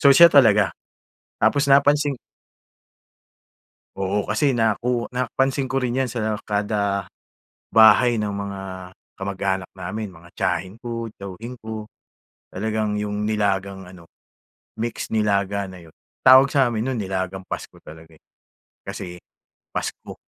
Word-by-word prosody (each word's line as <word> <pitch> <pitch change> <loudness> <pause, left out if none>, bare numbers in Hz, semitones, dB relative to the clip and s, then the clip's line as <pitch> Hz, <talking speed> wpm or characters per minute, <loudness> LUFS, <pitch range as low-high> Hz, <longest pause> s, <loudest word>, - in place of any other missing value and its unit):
So 140 - +7
siya 170 +4 +9
talaga. 105 -8 +6 0.7
Tapos 140 0 +3
napansin 145 +1 +4 1.8
Oo, 95 +1 -1
kasi 110 +7 +2
naku 115 +2 +1
napansin 135 +2 0
ko 135 - +1
rin 125 -2 -1
'yan 130 - -3
sa 110 -2 -1
kada 100 -2 -1 0.7
bahay 115 +1 +6
ng 105 - -1
mga 100 -1 -5 0.6
kamag-anak 95 -1 -2
namin 95 +2 -6
mga 85 +1 -16
tiyahin 95 +2 -1
ko, 115 -2 -5
tiyuhin 105 +6 -8
ko, 110 -1 -7 0.6
talagang 110 +1 -1
'yong 105 0 -2
nilagang 100 -2 -1
ano 90 -3 -14 0.7
mix 115 0 -4
nilaga 100 -2 0
na 90 - -11
'yon. 80 - -19 0.3
Tawag 130 +2 +8
sa 135 -2 +3
amin 115 -3 -1
no'n 130 - -2
nilagang 95 -1 -3
Pasko - - -7
talaga, 80 +1 -14
eh, - - -64 0.6
kasi 90 -1 -6 0.6
Pasko. - - -5
105 Hz, 125 wpm, -22 LUFS, 95-120 Hz, 1.8 s, siya